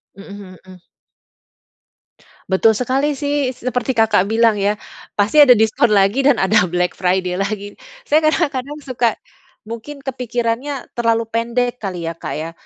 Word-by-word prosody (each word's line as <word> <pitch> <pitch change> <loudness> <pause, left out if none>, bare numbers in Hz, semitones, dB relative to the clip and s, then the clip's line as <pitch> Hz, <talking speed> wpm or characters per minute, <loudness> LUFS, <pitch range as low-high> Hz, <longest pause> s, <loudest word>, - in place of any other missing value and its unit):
Heeh 200 +1 -11 0.3
heeh. 185 -2 -15 1.7
Betul 220 +4 +4
sekali 265 +5 0
sih, 285 -2 -1
seperti 250 +1 -2
Kakak 215 -4 +3
bilang 225 -1 +2
ya, 205 +1 +1 0.4
pasti 210 +9 +2
ada 270 -4 +8
diskon 220 +1 +2
lagi 200 +7 +3
dan 285 - +5
ada 190 -1 +3
Black 180 +1 0
Friday 180 0 -1
lagi. 205 0 -4 0.3
Saya 310 -10 +3
kadang-kadang 295 -3 -1
suka 240 -4 0 0.5
mungkin 235 +6 -9
kepikirannya 250 +1 -3
terlalu 230 -1 0
pendek 240 +2 -1
kali 185 -4 -5
ya, 165 0 -3
Kak, - - -5
ya. 160 +2 -5
230 Hz, 135 wpm, -18 LUFS, 200-255 Hz, 1.7 s, ada